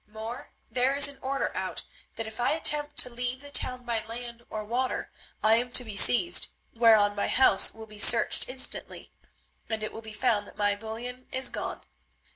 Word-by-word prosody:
More, 220 +3 -9 0.2
there 255 +2 0
is 285 0 +8
an 285 -1 -8
order 275 +1 -3
out - - -4 0.3
that 225 - -5
if 220 +1 -10
I 245 - +1
attempt 295 -2 +2
to - - +6
leave 245 +2 -5
the 285 0 -12
town 255 -2 +2
by 230 -2 -2
land 235 +1 -8
or 215 0 -5
water, 250 +4 -3 0.3
I 220 +1 +4
am 245 +1 -3
to 250 - +5
be 220 -4 -8
seized, 295 - +3 0.3
whereon 220 -3 +4
my 205 - -2
house 255 -7 +3
will 220 0 -11
be 210 -1 -12
searched 230 +3 +5
instantly, 255 0 0 0.6
and 220 -1 -3
it 215 - -5
will 225 - -9
be 220 -1 -11
found 210 -3 -1
that - - -16
my 205 -1 +1
bullion 235 +4 -8
is 260 0 0
gone. - - -6
235 Hz, 195 wpm, -27 LUFS, 220-255 Hz, 0.6 s, is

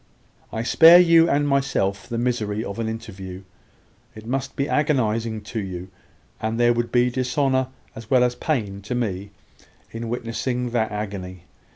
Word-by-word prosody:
"I 110 - -3
spare 165 +7 +8
you 165 -1 +6
and 145 +1 +2
myself 130 -9 0
the 120 - -3
misery 115 -3 -1
of 100 +2 -6
an 110 -1 -1
interview. 95 -4 -7 0.7
It 110 0 -11
must 135 +3 -3
be 140 - -1
agonising 115 -7 0
to 110 +2 -5
you, 95 -2 -6 0.5
and 110 +1 -2
there 120 0 +4
would 120 0 -2
be 125 0 +3
dishonour 130 +1 0 0.3
as 110 0 -11
well 130 -2 +4
as 125 0 +2
pain 105 -10 -2
to 105 +5 -4
me, 100 -5 -2 0.6
in 115 0 -5
witnessing 120 +1 -3
that 110 -2 0
agony. 95 -4 -6
115 Hz, 160 wpm, -23 LUFS, 105-130 Hz, 0.7 s, spare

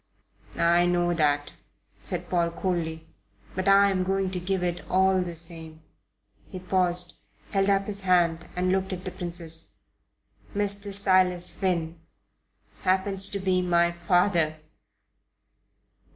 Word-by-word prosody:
"I 170 +1 +3
know 175 0 +1
that," 145 -3 +1 0.5
said 175 -1 -3
Paul, 170 -2 +1
coldly; 165 -2 -3 0.5
"but 185 +1 -3
I 200 0 +6
am 185 -1 0
going 190 0 -1
to 185 - -3
give 185 +1 -2
it 175 -1 -2
all 190 0 +3
the 175 -2 -5
same." 160 -1 -7 0.7
He 190 - -7
paused, 180 -1 0 0.4
held 195 -1 +1
up 195 0 +2
his 200 -1 -3
hand 175 -3 +2
and 180 +1 0
looked 190 0 0
at 185 0 -7
the 185 - -4
Princess. 170 -2 -3 0.8
"Mr. 205 0 0
Silas 185 -3 +3
Finn 170 -4 -2 0.8
happens 190 +1 +1
to 200 - -4
be 185 -1 +1
my 170 -1 +2
father." 170 -2 +1
180 Hz, 130 wpm, -26 LUFS, 170-190 Hz, 0.8 s, I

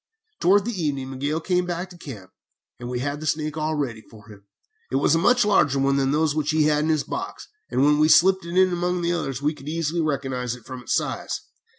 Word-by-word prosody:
"Towards 200 +3 +3
evening 140 -4 -2
Miguel 145 +4 -2
came 180 +1 0
back 175 +1 -4
to - - -12
camp, 105 - -10 0.5
and 120 - -6
we 125 0 -3
had 145 +2 -3
the 155 - -5
snake 155 0 -1
all 155 0 -1
ready 125 -7 -3
for 110 -1 -17
him. 100 -1 -15 0.4
It - - -3
was 140 +2 +3
a 165 - +3
much 245 +6 +4
larger 190 -9 +3
one 135 0 +2
than 135 -1 +1
those 150 +1 +1
which 150 -1 -1
he 155 0 +3
had 150 0 +2
in - - -1
his 155 -2 +2
box, 385 +2 -6 0.2
and 130 +2 +2
when 150 0 +4
we 155 +1 +4
slipped 190 +3 +5
it 170 +2 -4
in 185 -1 +4
among 175 0 -1
the 170 - +1
others 135 -6 -3
we 150 +2 +1
could 145 -1 -9
easily 165 +1 -1
recognize 135 -5 -2
it 125 - -16
from 130 -1 -8
its - - -1
size. - - -2
150 Hz, 240 wpm, -24 LUFS, 135-170 Hz, 0.5 s, slipped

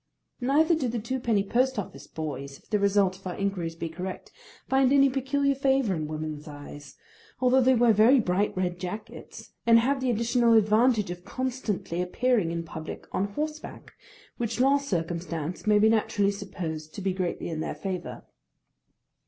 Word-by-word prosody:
Neither 295 +6 +3
do 305 -6 0
the 240 0 -2
twopenny 230 -2 0
post 260 +3 +1
office 205 - -6
boys, 140 -3 -6
if - - -28
the 210 - +2
result 200 -2 +2
of 195 - -9
our 180 - -4
inquiries 185 -5 -2
be 165 0 -4
correct, 180 +3 -7 0.4
find 265 -1 +3
any 275 -1 +5
peculiar 275 +1 +1
favour 270 -5 +1
in 155 -3 -3
woman's 155 0 -5
eyes, 145 -1 -10 0.4
although 255 +1 +4
they 260 +1 +4
wear 235 -1 +5
very 225 +6 +6
bright 195 -1 0
red 180 -1 -1
jackets, 215 +5 -8 0.2
and 230 0 +8
have 265 +4 +1
the 260 - 0
additional 235 +1 +2
advantage 215 -1 +3
of 175 0 -8
constantly 235 -7 -3
appearing 210 +1 +1
in 170 0 -3
public 160 -1 -8
on 190 - 0
horseback, 305 +3 -5 0.4
which 230 -1 -3
last 280 +2 +3
circumstance 170 -1 -3
may 210 -1 +5
be 210 +1 +5
naturally 210 -2 +2
supposed 165 -6 -6
to - - -5
be 190 -1 0
greatly 180 -2 -3
in 160 -2 -4
their 160 - -3
favour. 190 -2 -5
210 Hz, 170 wpm, -27 LUFS, 175-255 Hz, 0.4 s, and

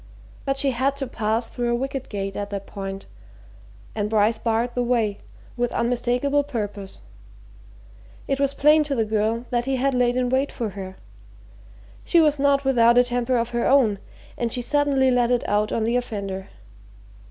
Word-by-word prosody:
But 275 0 0
she 275 0 +2
had 265 +3 0
to 280 -1 -3
pass 225 -1 -1
through 240 0 -2
a - - +2
wicket 270 +1 -4
gate 195 -1 -4
at 205 0 -4
that 200 -1 -5
point, 195 -1 -7 0.9
and 210 -1 -2
Bryce 220 +1 +2
barred 230 +1 0
the 245 - -1
way, 230 -4 0 0.4
with 245 -1 -1
unmistakable 245 +4 +1
purpose. 205 -7 -6 1.3
It 275 0 -1
was 280 0 +1
plain 300 +2 +5
to 285 -1 -2
the 225 -3 +1
girl 220 +2 -1
that 240 -1 0
he 270 0 0
had 270 +2 +1
laid 245 -1 +2
in 250 -1 +1
wait 265 +2 +1
for 230 -4 -3
her. 190 -1 -8 1.1
She 345 - +3
was 300 -3 +3
not 280 0 +2
without 235 -3 +4
a 245 - +7
temper 245 0 0
of 235 0 -1
her 240 0 0
own, 230 -8 +3 0.4
and 235 -1 -1
she 245 - -2
suddenly 275 -1 +2
let 245 -1 +2
it 245 -1 0
out 210 +1 +1
on 225 - 0
the 230 +2 0
offender. 200 -5 -4
240 Hz, 180 wpm, -23 LUFS, 220-270 Hz, 1.3 s, a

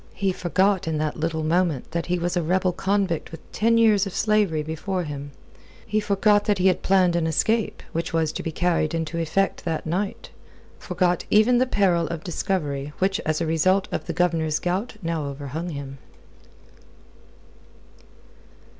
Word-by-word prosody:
He 195 -1 0
forgot 185 +1 +1
in 160 -1 0
that 155 0 -2
little 160 0 -1
moment 165 -4 0
that 170 0 -2
he 180 0 +1
was 175 +1 -2
a 175 - +2
rebel 180 +3 +1
convict 190 -2 -1
with 165 - -12
ten 230 +1 +2
years 210 -3 +4
of 185 - -7
slavery 210 -8 +2
before 175 +4 -3
him; 145 -2 -6 0.6
he 215 - 0
forgot 205 0 +2
that 205 -2 +2
he 185 - 0
had 185 -2 +3
planned 185 -2 +3
an 165 -1 +1
escape, 220 +7 0
which 165 0 -3
was 160 -2 +1
to - - -5
be 165 - -4
carried 165 -1 0
into 165 +1 -3
effect 170 +4 0
that 165 -2 -2
night; 190 +5 -3 0.5
forgot 180 -1 0
even 240 +4 +5
the 255 - +2
peril 180 -7 +2
of 170 -1 -5
discovery 150 -6 -2
which 195 +2 +1
as 155 +1 0
a - - +1
result 185 +5 +2
of - - -3
the - - -1
Governor's 160 -3 +1
gout 190 +7 -2
now 165 -3 -2
overhung 140 +4 -5
him. 140 -3 -7
175 Hz, 170 wpm, -24 LUFS, 160-195 Hz, 0.6 s, even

